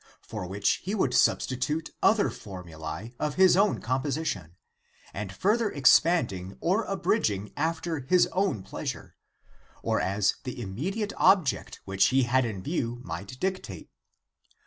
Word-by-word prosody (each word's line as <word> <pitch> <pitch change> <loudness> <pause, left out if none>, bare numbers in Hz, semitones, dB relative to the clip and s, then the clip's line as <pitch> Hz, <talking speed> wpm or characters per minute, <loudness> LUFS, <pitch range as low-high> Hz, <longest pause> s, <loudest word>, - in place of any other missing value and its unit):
for 105 -5 -6
which 100 +2 +1
he 195 +4 -3
would 135 -11 +1
substitute 130 +5 +1
other 215 -2 +4
formulae 90 +2 -8
of 150 - -1
his 185 -1 +6
own 200 +2 +3
composition, 130 - -2 0.6
and 100 -1 -5
further 210 - +1
expanding 130 - +3
or 195 +6 +1
abridging 105 - 0
after 160 +1 -1
his 175 +7 +3
own 180 - 0
pleasure, - - -6 0.7
or - - +1
as 100 +1 +1
the 125 -1 -6
immediate 175 - -3
object 180 -9 +2
which 95 0 +2
he 130 0 +3
had 130 +1 +2
in 100 -5 -5
view 120 - -2
might 125 +2 -7
dic 190 0 -1
tate. - - -10
130 Hz, 135 wpm, -27 LUFS, -, 0.7 s, his